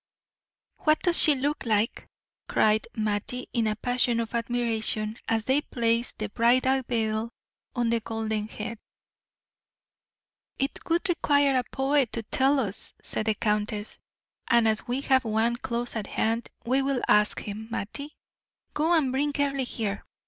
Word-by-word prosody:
"What 310 0 +3
does 350 -2 +4
she 300 -3 +6
look 285 +3 -1
like?" 220 -2 0 0.4
cried 215 0 +2
Mattie 215 +3 -2
in 230 -3 +1
a 215 - 0
passion 245 +1 +1
of 230 0 -3
admiration, 225 -2 -1
as 225 -1 +1
they 270 +3 +3
placed 235 -2 -1
the 215 -1 -3
bridal 255 +4 +3
veil 220 -1 0 0.5
on 240 -2 +1
the 235 - +2
golden 220 -1 -3
head. 225 +1 -6 1.8
"It 275 +1 -2
would 340 +3 +2
require 285 -5 +3
a 255 - +2
poet 270 -2 +1
to 230 - -2
tell 270 +6 +2
us," 210 -5 -3
said 220 - -3
the 215 - +2
countess; 210 0 -2 0.5
"and 235 -1 +5
as 220 +2 0
we 250 +3 -1
have 265 -2 +3
one 225 +1 +1
close 240 0 -2
at 215 -3 -3
hand, 225 +1 -1 0.2
we 260 +3 +2
will 270 -2 -1
ask 210 0 +3
him. 215 +1 -6
Mattie, 280 +7 -4 0.6
go 320 +3 +2
and 275 -5 +1
bring 285 +3 0
Earle 280 -2 +1
here. 215 -5 -2
235 Hz, 150 wpm, -27 LUFS, 220-265 Hz, 1.8 s, she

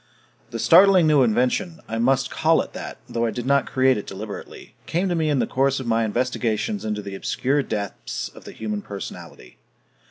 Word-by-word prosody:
The 115 - -5
startling 185 - +6
new 150 -3 +5
invention 130 - +1
I 115 +1 -3
must 135 +3 +2
call 160 +1 +3
it - - -14
that, - - -7
though 115 0 -1
I - - 0
did 120 +2 -5
not 140 +1 +2
create 130 -3 +3
it - - -9
deliberately 100 +2 -8
came 180 +4 0
to - - +1
me 160 -2 0
in 145 - +2
the - - +2
course 135 +1 +1
of 130 - -6
my 115 0 +1
investigations 125 - -1
into 105 -1 -3
the 100 -1 -7
obscure 135 +8 0
depths 105 -6 -4
of - - -15
the - - -9
human 105 -2 -4
personality. 100 -2 -9
125 Hz, 195 wpm, -23 LUFS, 110-145 Hz, -, startling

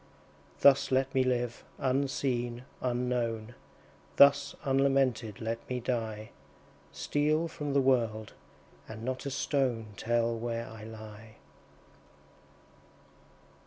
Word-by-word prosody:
Thus 140 -1 +6
let 130 +1 +2
me 130 - +3
live, 120 -2 -1
unseen, 130 -2 -1 0.2
unknown; 120 -2 -1 0.6
Thus 140 0 +6
unlamented 135 -6 +1
let 115 +1 -2
me 125 -1 -1
die; 110 -3 -3 0.6
Steal 155 +3 0
from 150 -3 -4
the 140 - +4
world, 115 -5 +1 0.6
and 110 0 -8
not 130 +2 -3
a - - -1
stone 130 -6 -1
Tell 115 0 +1
where 115 0 -3
I 110 -3 -10
lie. 110 0 -11
125 Hz, 100 wpm, -30 LUFS, 115-135 Hz, 0.6 s, Thus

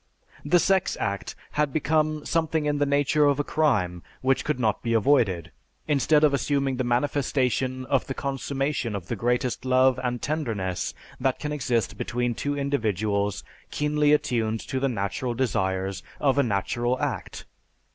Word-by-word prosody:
The 165 +5 +4
sex 190 +1 +2
act 100 -1 -3 0.2
had 150 -1 0
become 155 +1 0
something 160 -2 0
in 145 -1 0
the 145 - +2
nature 145 +1 +3
of 140 0 +2
a - - +2
crime 105 - +1 0.2
which 135 0 +2
could 150 -4 -1
not 110 -4 +1
be 115 -1 -1
avoided, 115 - +2 0.4
instead 150 +1 +3
of 150 -2 +5
assuming 140 -1 0
the 130 - 0
manifestation 130 0 0
of 135 0 0
the 135 - -4
consummation 135 -3 -2
of 95 -3 -6
the - - -1
greatest 125 +1 0
love 130 0 +3
and 125 -1 -1
tenderness 115 - -2 0.2
that 130 0 +1
can 150 - -4
exist 125 -6 -1
between 120 0 -1
two 145 +5 -2
individuals 105 - 0 0.3
keenly 150 0 +1
attuned 115 -6 +1
to 130 - -3
the 135 +1 +1
natural 120 +3 -2
desires 95 -6 -1 0.2
of 140 -1 +2
a - - +7
natural 120 +2 0
act. - - -4
130 Hz, 155 wpm, -26 LUFS, 115-145 Hz, 0.4 s, a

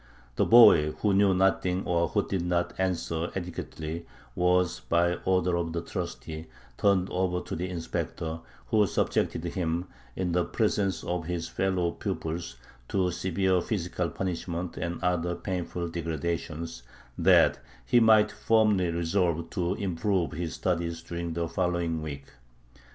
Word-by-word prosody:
The - - +2
boy 105 -10 +8
who 105 -2 0
knew 100 -1 +4
nothing 95 0 +1
or 85 -1 +2
who - - 0
did 95 -3 -1
not 85 0 0
answer 85 -3 -1
adequately 85 -2 -5 0.3
was 90 -6 +2
by 85 +7 +1
order 90 -1 +2
of 85 -1 -2
the 85 - -1
trustee 85 -3 -5 0.3
turned 95 -2 +3
over 90 -1 0
to - - -5
the 90 +3 -3
inspector, 80 -1 -4 0.3
who 105 -2 +4
subjected 80 - 0
him, 85 0 -1 0.3
in 90 -2 -1
the 90 +1 +2
presence 100 -1 0
of 85 -2 -3
his 85 -2 -2
fellow 90 -2 0
pupils, 85 - -4 0.3
to 95 -2 +1
severe 95 +1 +1
physical 90 -3 -2
punishment 90 -1 -4
and 85 0 -3
other 90 -1 0
painful 90 -2 -3
degradations, 85 -2 -3 0.3
that - - +5 0.3
he 120 - +5
might 110 -2 +5
firmly 105 -5 +2
resolve 85 -1 0
to 90 +1 -1
improve 95 -4 -1
in - - -6
his 85 -2 -3
studies 85 -2 -2
during 85 -1 -4
the 85 0 -1
following 85 -1 -1
week. 70 -3 -6
85 Hz, 140 wpm, -28 LUFS, 85-95 Hz, 0.3 s, boy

